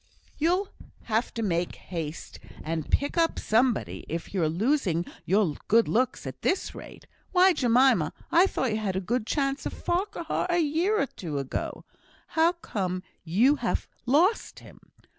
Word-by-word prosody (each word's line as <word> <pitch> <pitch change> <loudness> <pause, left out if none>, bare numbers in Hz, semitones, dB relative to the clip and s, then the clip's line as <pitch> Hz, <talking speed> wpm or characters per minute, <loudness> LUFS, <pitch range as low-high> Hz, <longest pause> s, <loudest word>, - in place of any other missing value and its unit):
"You'll 360 +6 +1 0.3
have 225 +1 0
to 230 - -2
make 175 -3 -1
haste 165 -3 -6 0.2
and 160 -1 -3
pick 285 +4 +1
up 330 0 +2
somebody, 240 +3 +1
if 165 +4 -5
you're 170 -5 +1
losing 185 - +1 0.2
your 195 -4 +2
good 230 +2 +4
looks 250 +3 0
at - - -7
this 370 - 0
rate. - - -11 0.3
Why, 370 0 +6
Jemima, 255 -2 +3 0.2
I 350 +3 +6
thought 260 - -1
you 215 - 0
had 200 -3 -2
a - - +1
good 220 +4 -2
chance 275 +1 -1
of - - -6
Farquhar 350 -1 -2
a 350 - +2
year 340 +7 +1
or - - +2
two 165 - -6
ago. 135 -1 -4 0.4
How 330 +2 +3
come 185 - -3 0.2
you 225 - +3
to - - -17
have - - -1 0.2
lost 340 - +2
him? - - -15
240 Hz, 160 wpm, -27 LUFS, -, 0.4 s, Why